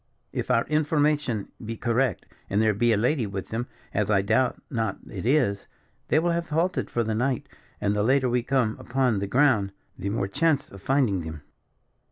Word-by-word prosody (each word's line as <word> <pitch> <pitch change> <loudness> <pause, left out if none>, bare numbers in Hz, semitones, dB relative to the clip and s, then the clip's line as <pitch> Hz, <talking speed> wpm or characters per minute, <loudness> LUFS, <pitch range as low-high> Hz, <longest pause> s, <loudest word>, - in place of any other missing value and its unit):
"If - - -3
our 115 - +3
information 150 - +1
be 115 +1 -5
correct, 120 -2 0 0.2
and 100 - +1
there 110 -1 +3
be 120 +4 +2
a 110 - +3
lady 120 +1 +1
with 95 -1 -5
them, 120 +3 -3 0.3
as 105 0 0
I 95 -2 +3
doubt 130 +6 +2
not 115 -3 -1
it 100 +1 -5
is, 125 -8 +2 0.4
they - - +3
will 170 +2 +2
have 170 0 -2
halted 170 +4 0
for 120 - 0
the 110 0 -1
night, 125 +3 0 0.3
and 105 0 0
the 105 - +1
later 130 +4 +3
we 125 0 +1
come 125 -3 +1
upon 125 -4 +1
the 100 - -2
ground, 115 -5 +3 0.3
the 100 +1 -2
more 100 -1 -1
chance 145 +5 +1
of 100 - -11
finding 130 -8 +2
them." 80 -2 -7
120 Hz, 195 wpm, -26 LUFS, 105-140 Hz, 0.4 s, our